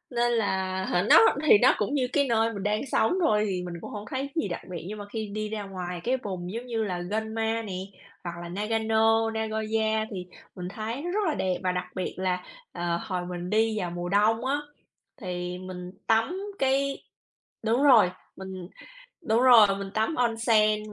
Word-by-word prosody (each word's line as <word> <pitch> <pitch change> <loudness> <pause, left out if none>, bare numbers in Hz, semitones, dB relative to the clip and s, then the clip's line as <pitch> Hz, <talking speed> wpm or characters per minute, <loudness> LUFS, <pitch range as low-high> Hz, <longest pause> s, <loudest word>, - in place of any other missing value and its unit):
nên 240 0 +2
là, 190 -4 0
hả 175 - +1
nó - - +9 0.3
thì 215 - +9
nó - - +6
cũng 210 +7 -1
như 260 -3 +1
cái 280 -2 +3
nơi 230 -1 +2
mình 200 -2 -5
đang 210 +1 0
sống 220 - +3
thôi 215 -11 +3
thì 180 -1 -2
mình 175 - -6
cũng - - -8
hông 210 0 -6
thấy 270 +1 -2
gì 320 - 0
đặc 175 - -4
biệt. 175 -2 -6
Nhưng 215 - -6
mà 205 - -6
khi 220 -2 -3
đi 215 0 -3
ra 215 -1 -4
ngoài 180 -3 -6
cái 255 +2 +1
vùng, 180 -3 -5
giống 235 +2 -5
như 230 -3 -1
là, 180 -4 -2
Gunma 220 +1 -1
nè, 200 -4 -6 0.5
hoặc 175 - -4
là 175 - -7
Nagano, 225 +2 +2
Nagoya 220 0 -1
thì 180 -2 -6 0.3
mình 180 -1 -5
thấy 220 +6 -4
nó 350 +3 -3
rất 415 - 0
là 315 - +1
đẹp. 185 -1 0
Và 185 - +2
đặc 180 0 -2
biệt 185 - -3
là, 185 -1 -1 0.3
ờ, 175 -1 -2
hồi 180 -2 -2
mình 175 0 -5
đi 220 0 +2
vào 180 - -2
mùa 175 0 -4
đông 220 +5 +2
á, 275 +2 +1 0.6
thì 180 -2 -4
mình 180 -1 -8 0.2
tắm 225 +12 +2 0.2
cái 275 +1 +1 0.6
đúng 235 +5 +2
rồi, 220 -10 +6 0.2
mình 190 -2 -8 0.6
đúng 235 -4 +2
rồi, 240 -5 +8
mình 195 -1 -5
tắm 220 +8 +1
onsen 220 -4 +2
215 Hz, 200 wpm, -27 LUFS, 185-225 Hz, 0.6 s, nó